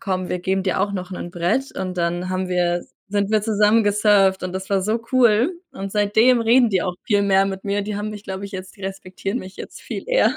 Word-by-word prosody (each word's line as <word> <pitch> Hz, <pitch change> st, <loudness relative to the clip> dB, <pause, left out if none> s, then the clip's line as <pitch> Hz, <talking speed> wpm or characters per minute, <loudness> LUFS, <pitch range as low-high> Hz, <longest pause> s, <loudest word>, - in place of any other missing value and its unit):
komm, 185 Hz, -4 st, -2 dB
wir 180 Hz, -, -1 dB
geben 190 Hz, +2 st, -1 dB
dir 185 Hz, -1 st, 0 dB
auch 200 Hz, +1 st, 0 dB
noch 185 Hz, -1 st, -5 dB
’nen 180 Hz, -1 st, -6 dB
Brett“, 180 Hz, +10 st, -1 dB
und 185 Hz, -1 st, -4 dB
dann 175 Hz, +2 st, -1 dB
haben 185 Hz, 0 st, -2 dB
wir 175 Hz, -1 st, 0 dB, 0.2 s
sind 205 Hz, 0 st, 0 dB
wir 215 Hz, -1 st, +2 dB
zusammen 215 Hz, 0 st, +3 dB
gesurft 205 Hz, -2 st, +3 dB
und 185 Hz, 0 st, -4 dB
das 190 Hz, +1 st, -5 dB
war 195 Hz, -, +2 dB
so 215 Hz, +5 st, 0 dB
cool. 240 Hz, -, +4 dB, 0.2 s
Und 195 Hz, 0 st, -6 dB
seitdem 220 Hz, +4 st, +4 dB
reden 235 Hz, +1 st, +4 dB
die 190 Hz, -, +2 dB
auch 180 Hz, 0 st, -2 dB
viel 205 Hz, -2 st, +3 dB
mehr 195 Hz, -1 st, +3 dB
mit 195 Hz, -1 st, -4 dB
mir. 200 Hz, 0 st, -1 dB
Die 205 Hz, 0 st, -4 dB
haben 210 Hz, +1 st, -3 dB
mich, 210 Hz, -1 st, -8 dB
glaube 190 Hz, +1 st, -5 dB
ich, -, -, -12 dB
jetzt 190 Hz, +1 st, -8 dB
die 195 Hz, -, -15 dB
respektieren 195 Hz, +3 st, -4 dB
mich 190 Hz, -4 st, -10 dB
jetzt -, -, -9 dB
viel -, -, -6 dB
eher. -, -, +3 dB
195 Hz, 245 wpm, -21 LUFS, 185-210 Hz, 0.2 s, cool